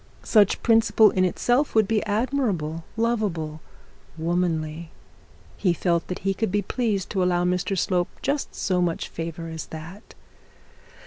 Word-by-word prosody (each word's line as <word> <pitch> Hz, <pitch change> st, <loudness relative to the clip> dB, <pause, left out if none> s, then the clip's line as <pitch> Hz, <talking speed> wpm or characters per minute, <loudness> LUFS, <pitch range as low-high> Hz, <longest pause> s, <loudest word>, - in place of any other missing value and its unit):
Such 210 Hz, -4 st, +3 dB
principle 225 Hz, -2 st, +5 dB
in 185 Hz, -, +1 dB
itself 245 Hz, +10 st, +1 dB
would 220 Hz, -2 st, +4 dB
be 220 Hz, -1 st, +1 dB
admirable, 205 Hz, -, -1 dB
loveable, 195 Hz, -10 st, -1 dB, 0.6 s
womanly; 165 Hz, -1 st, -1 dB, 0.7 s
he 185 Hz, -4 st, +2 dB
felt 170 Hz, 0 st, 0 dB
that 180 Hz, -, -4 dB
he 195 Hz, -, +2 dB
could 205 Hz, 0 st, -2 dB
be 205 Hz, +1 st, +1 dB
pleased 210 Hz, -3 st, -1 dB
to 195 Hz, -, 0 dB
allow 175 Hz, -1 st, +2 dB
Mr 180 Hz, +2 st, 0 dB
Slope 180 Hz, +1 st, +1 dB
just 280 Hz, +1 st, -1 dB
so 180 Hz, -2 st, 0 dB
much 170 Hz, -2 st, -1 dB
favour 165 Hz, 0 st, -5 dB
as 160 Hz, -1 st, -6 dB
that. 160 Hz, +7 st, -10 dB
185 Hz, 140 wpm, -24 LUFS, 165-215 Hz, 0.7 s, principle